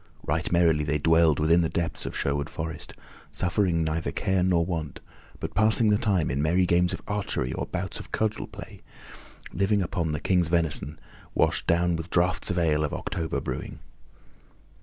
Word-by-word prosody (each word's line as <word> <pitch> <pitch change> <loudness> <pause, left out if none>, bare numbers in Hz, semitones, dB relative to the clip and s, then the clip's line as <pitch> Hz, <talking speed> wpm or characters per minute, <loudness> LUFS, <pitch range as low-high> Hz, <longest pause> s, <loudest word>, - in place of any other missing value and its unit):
Right 80 +2 -1
merrily 85 -3 +3
they 75 +1 0
dwelled 80 0 +4
within 80 +3 +4
the 80 - 0
depths 85 -1 -2
of - - -5
Sherwood 70 0 -1
Forest, 80 0 -6 0.4
suffering 90 -2 +1
neither 80 0 -1
care 95 -1 0
nor 90 -2 +2
want, 80 -5 -4 0.4
but - - -5
passing 110 +2 +3
the 105 - +4
time 95 - +1
in 70 +3 -1
merry 85 +4 +3
games 90 0 +2
of - - -5
archery 100 -11 -2
or - - -3
bouts - - -4
of - - -11
cudgel 110 -1 -1
play, - - -11 0.7
living 100 +1 +2
upon 85 -3 -2
the 75 - -2
King's 90 0 +2
venison, 80 -3 -1 0.4
washed - - +1
down 85 0 +2
with 80 +1 -5
draughts 90 0 +1
of 90 - -1
ale 80 -3 +2
of 75 - -2
October 80 -2 -3
brewing. - - -5
85 Hz, 175 wpm, -26 LUFS, 80-90 Hz, 0.7 s, dwelled